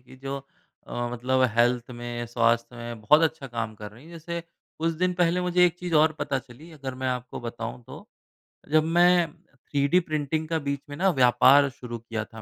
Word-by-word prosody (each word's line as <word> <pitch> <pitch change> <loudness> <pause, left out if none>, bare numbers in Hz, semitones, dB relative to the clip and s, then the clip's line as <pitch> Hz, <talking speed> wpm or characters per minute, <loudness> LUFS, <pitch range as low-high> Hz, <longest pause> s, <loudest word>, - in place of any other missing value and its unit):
की, 125 +1 -16
जो 135 +1 -5 0.5
अ, - - -11 0.2
मतलब 130 +2 +1
हेल्थ 120 +1 +2
में, 120 0 -5
स्वास्थ्य 115 0 +1
में, 120 -1 -7
बहुत 150 +10 +5
अच्छा 160 -3 0
काम 115 -3 -4
कर 105 0 -9
रही 115 +7 -16
हैं। 165 - -14
जैसे 170 +1 -5 0.4
कुछ 165 +1 0
दिन 185 0 +3
पहले 175 0 +2
मुझे 180 0 +3
एक 175 - -1
चीज़ 180 -2 -3
और 155 +1 +5
पता 135 - -1
चली, 130 +6 -14
अगर 135 -4 -6
मैं 130 - +1
आपको 125 0 -4
बताऊँ 115 0 -6
तो। - - -11 0.7
जब 155 0 +5
मैं 175 0 +4 0.2
थ्रीडी 140 +5 +1
प्रिंटिंग 155 0 -1
का 165 0 0
बीच 140 -1 -3
में 145 - -6
ना, 190 +1 +3
व्यापार 130 0 +5
शुरू 120 -2 -8
किया 115 -1 -5
था 110 +1 -12
135 Hz, 200 wpm, -26 LUFS, 120-160 Hz, 0.7 s, बहुत